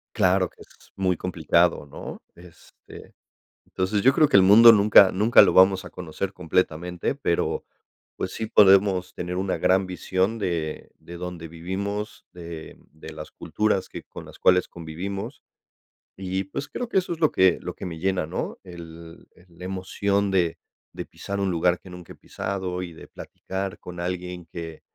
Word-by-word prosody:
Claro 95 -3 +3
que - - -22
es - - -19
muy 90 -3 0
complicado, 85 -2 +1
¿no? 70 - -9
Este, 85 -1 -16 0.5
entonces 95 +3 -1
yo 135 +6 +5
creo 150 0 +4
que - - +4
el 95 - +6
mundo 115 +4 +9
nunca, 100 -2 +7
nunca 105 +5 +5
lo - - +4
vamos 95 +1 +5
a - - -9
conocer 90 +2 -5
completamente, 90 - -1
pero, 85 -11 -1 0.5
pues, 95 - -4
sí 110 - -4
podemos 95 -3 +4
tener 90 +1 -5
una 95 0 -1
gran 95 +1 +2
visión 95 +4 -1
de 85 -6 -3
de 85 - -10
dónde 85 -2 -7
vivimos, 100 +5 -5
de 85 -2 -9 0.2
de 80 +1 -11
las 75 0 -9
culturas 105 -3 -1
que - - -9
con - - -11
las - - -14
cuales 90 0 +3
convivimos. 95 - -7 0.8
Y, 95 0 -3
pues, 140 +8 -6
creo 240 - -5
que - - 0
eso 185 -2 0
es 165 - -9
lo 155 -3 +3
que 95 -1 +3
lo - - -6
que - - -8
me 85 -3 -6
llena, 95 -1 0
¿no? 80 - -5
El 85 -2 -12
el 90 - -21
la 90 - -7
emoción 100 +1 -1
de 85 -3 +1 0.4
de - - -6
pisar 100 0 -6
un 95 -2 0
lugar 85 +1 +1
que 95 - -14
nunca 90 -1 -11
he - - -18
pisado, 95 -2 -4
y 90 - -6
de - - -13
platicar 95 0 -6
con 90 -1 -9
alguien 90 -1 -5
que 80 -2 -8
95 Hz, 175 wpm, -24 LUFS, 85-100 Hz, 0.8 s, mundo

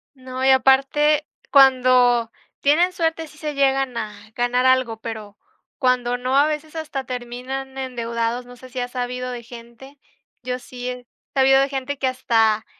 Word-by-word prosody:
No, 255 0 -6
y 265 - +4
aparte 275 +3 +3 0.2
cuando 255 -3 +5 0.3
tienen 330 +6 +3
suerte 325 -2 -1
sí 305 - -17
se 300 -1 -4
llegan 270 -2 +1
a 215 -2 -4 0.2
ganar 245 +1 +1
algo, 255 -3 +3
pero 215 -3 -7 0.4
cuando 250 -2 +1
no, 255 +2 -1
a 285 +2 +5
veces, 310 +1 -4
hasta 295 -4 -4
terminan 255 +2 -6
endeudados, 235 -2 -3
no 245 - -13
sé 255 +1 -14
si 255 0 -6
ha 245 - -2
sabido 250 0 -4
de 240 -1 -7
gente, 240 +4 -13 0.4
yo 250 0 -3
sí 250 0 -7
he 250 -1 -8 0.3
sabido 270 0 +5
de 275 - +1
gente 275 +1 -4
que 265 - +1
hasta 225 -4 +1
255 Hz, 165 wpm, -22 LUFS, 245-270 Hz, 0.4 s, cuando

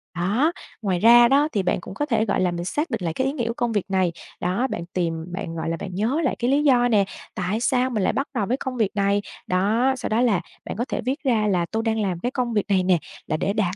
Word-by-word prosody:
Đó, 210 - +2 0.3
ngoài 190 -5 0
ra 235 +3 +8
đó 280 +4 +4
thì 200 - 0
bạn - - +1
cũng - - -9
có 290 +9 -1
thể, 225 -6 +1
gọi 200 - 0
là, 180 -1 +2
mình 175 0 -4
xác 300 - -1
định 230 -6 -2
lại 165 -2 -1
cái 260 +10 0
ý 270 - -1
nghĩa 240 -6 -2
của 230 - -1
công 240 0 -1
việc 205 -4 0
này. 185 -2 +2 0.3
Đó, 185 +9 0
bạn 170 - -4
tìm 170 -3 0 0.2
bạn, 180 -3 -5
gọi 165 0 -3
là, 165 - -2
bạn 185 - -6
nhớ 235 - 0
lại 265 - +1
cái 245 +1 +1
lý 290 +2 +3
do 245 -4 +4
nè: 210 -4 +3 0.3
"Tại 185 +4 -1
sao 255 +1 +1
mình 215 -6 -1
lại - - +2
bắt 275 - -1
đầu 220 -6 0
với 250 +6 0
công 260 -2 -5
việc 215 -4 0
này?" 200 0 +2 0.3
Đó, 215 +8 +2
sau - - -4
đó 220 +2 +2
là 215 -8 +2 0.2
bạn - - -5
có 240 - -1
thể - - -3
viết 265 +6 -3
ra 225 -6 +2
là 180 -4 +1
"Tôi 225 0 -1
đang 225 -1 0
làm 185 -4 -1
cái 245 +7 -2
công 245 -3 -1
việc 210 -2 +1
này 190 -2 +3
nè, 180 -1 +4 0.3
là 155 - 0
để 200 - -1
đạt 195 -4 0
220 Hz, 290 wpm, -23 LUFS, 185-250 Hz, 0.3 s, ra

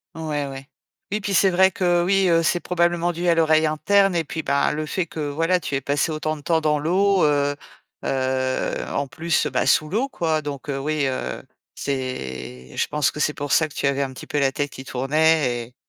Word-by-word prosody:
Ouais, 150 -3 -2
ouais, 135 0 -8 0.4
et 210 +1 -2
puis, 200 0 -2
c'est 190 +1 +5
vrai 190 +1 +4
que, 175 -2 +1
oui, 195 +1 +3
heu, 165 0 +3
c'est 175 +1 +2
probablement 175 0 0
dû 175 +1 -1
à 170 - +4
l'oreille 160 -1 +4
interne, 195 +6 +3
et 165 -2 0
puis, 160 +2 -5
bah, 140 +1 +1
le 155 +1 -3
fait 180 +3 -2
que, 160 -1 -7
voilà, 165 +5 +1
tu 145 - -5
aies - - +1
passé 145 +4 0
autant 155 0 -2
de 150 - -11
temps 160 +2 +1
dans 150 -1 +1
l'eau, 190 +4 +2
heu, 145 -1 +2 0.5
heu, 130 -1 -1
en 140 - -1
plus, 160 +4 0
bah, 125 -3 0
sous 155 +3 +3
l'eau, 235 - 0
quoi, 160 -6 -1
donc 145 -3 -6
heu, 135 - -1
oui, 150 +2 -1
heu, 130 - -3 0.3
c'est 65 - -5
je - - 0
pense 150 -3 +1
que 150 - -5
c'est 150 - +1
pour 145 -1 -3
ça 160 -2 +3
que - - -15
tu 140 - -1
avais 140 0 0
un 135 -1 -2
petit 130 - -10
peu 150 - -3
la 135 -1 +2
tête 145 +1 -2
qui 130 - -10
tournait 135 -2 +1
et 120 +2 -20
155 Hz, 225 wpm, -22 LUFS, 140-170 Hz, 0.5 s, c'est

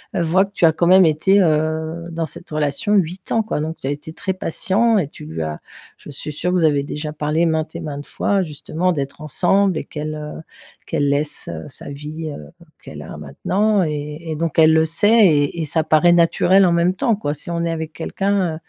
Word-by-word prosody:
heu, - - +1
voit 180 +4 +3
que 195 - -18
tu - - -4
as 160 - +6
quand 170 +2 0
même 185 +1 +7
été, 165 +6 +3
heu, 160 0 0
dans 165 0 -2
cette 160 +3 -10
relation 150 +6 -1
8 185 -1 0
ans 225 - +2
quoi. 215 - -3
Donc 160 +2 -3
tu - - -4
as - - 0
été 150 +2 -7
très 190 - -3
patient 200 +5 +1
et 165 -8 0
tu - - -12
lui 80 +1 -5
as 80 -1 -4 0.4
je - - -13
suis 150 +2 -5
sûre 165 +4 -2
que - - +1
vous 175 - +2
avez 145 -3 +3
déjà 150 +1 -5
parlé 150 +2 0
maintes 160 0 -1
et 170 - -5
maintes 145 -3 -6
fois, 200 -1 0
justement, 165 +2 -2
d'être 140 -2 -4
ensemble 180 +5 +1
et - - -3
qu'elle, 155 0 -5
heu, 150 +1 -7 0.5
qu'elle 145 -1 0
laisse, 145 +1 -1
heu, - - -7
sa 145 - -7
vie, 150 +3 -6
heu, 75 - -9 0.3
qu'elle - - -10
a - - -9
maintenant 190 - 0
et 150 -1 -4
et - - -2
donc 165 -1 -2
elle 160 0 +7
le 160 0 +4
sait 205 +6 +5
et 145 0 +1
et 160 - -1
ça 160 +2 0
paraît 155 +3 +4
naturel 175 +3 +4
en 175 - +3
même 170 +2 +2
temps, 220 +2 +1
quoi. 145 -8 -2
Si 155 +3 -7
on 170 0 -1
est - - -1
avec 160 -1 -4
quelqu'un, 185 +2 -1
160 Hz, 230 wpm, -20 LUFS, 150-180 Hz, 0.5 s, même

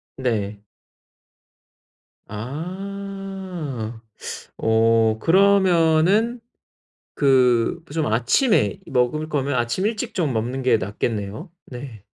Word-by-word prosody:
네. 105 -5 -2 1.7
아, 180 - -6 0.6
어 110 0 +3
그러면은 190 - +3 0.8
그 130 +2 +3
그 145 - -12
좀 160 -2 0
아침에 195 - +2
먹을 135 +5 0
거면 140 -1 -1
아침 120 - 0
일찍 220 -1 -3
좀 155 -8 0
먹는 125 +4 -2
게 125 - +4
낫겠네요, 105 - -4 0.2
네. 120 -5 -9
135 Hz, 150 characters per minute, -22 LUFS, 115-185 Hz, 1.7 s, 게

